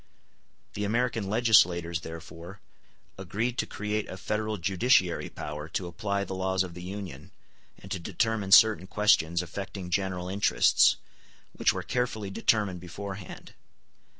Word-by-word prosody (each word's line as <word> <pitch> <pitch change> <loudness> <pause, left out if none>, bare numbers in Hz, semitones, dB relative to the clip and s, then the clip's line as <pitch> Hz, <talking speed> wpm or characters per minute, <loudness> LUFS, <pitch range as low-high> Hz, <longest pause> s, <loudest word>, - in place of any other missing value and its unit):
The 105 - -3
American 115 -1 0
legislators 90 -7 +3
therefore 85 +4 -9 0.6
agreed 110 +7 -2
to - - 0
create 105 +1 -3
a 95 - -7
federal 105 +2 -2
judiciary 95 +1 +2
power 75 +1 -7
to 90 - -3
apply 100 +4 -2
the 100 - -6
laws 95 0 0
of 90 -2 -8
the 90 - -9
Union, 95 -6 -7 0.5
and 95 - -14
to 95 - -2
determine 110 +2 -1
certain 105 -2 +7
questions 90 -5 +2
affecting 95 +1 -7
general 95 -1 -1
interests, 100 +2 +4 0.6
which - - +2
were - - -4
carefully 110 -5 -2
determined 100 -3 +1
beforehand. 95 +2 -8
95 Hz, 130 wpm, -28 LUFS, 90-105 Hz, 0.6 s, certain